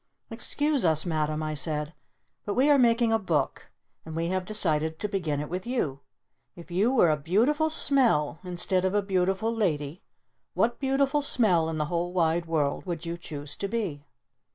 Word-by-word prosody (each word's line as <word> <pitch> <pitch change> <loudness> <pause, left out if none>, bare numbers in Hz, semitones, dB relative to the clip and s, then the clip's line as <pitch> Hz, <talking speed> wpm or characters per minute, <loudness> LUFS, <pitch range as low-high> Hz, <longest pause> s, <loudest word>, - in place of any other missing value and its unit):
"Excuse 295 -2 0
us, 160 -2 +2
Madam," 155 -2 -1
I 155 0 -2
said. 150 +1 -2 0.5
"But 205 - -3
we 275 +4 +4
are 285 - +5
making 235 -2 +3
a 225 - +3
book! 160 -9 -1 0.3
And 160 0 -8
we 165 +1 -1
have 185 0 -1
decided 160 -7 0
to 210 - -2
begin 175 -8 -2
it 150 - -4
with 180 +6 -5
you! 155 - -1 0.6
If 175 0 -12
you 200 +8 +2
were 200 -11 +4
a - - +3
Beautiful 230 - +1
Smell 240 - +2
instead 180 +1 -1
of 190 +1 0
a 205 - +2
Beautiful 190 +3 0
Lady, 160 -7 -1 0.5
what 235 +1 +1
Beautiful 275 +1 +1
Smell 190 - +2
in 160 - -3
the 150 - 0
Whole 175 +2 -2
Wide 170 -1 +1
World 150 -4 0
would 170 -1 -4
you 170 0 -3
choose 145 -4 -7
to 200 - -3
be?" 190 -10 -3
180 Hz, 180 wpm, -27 LUFS, 155-225 Hz, 0.6 s, are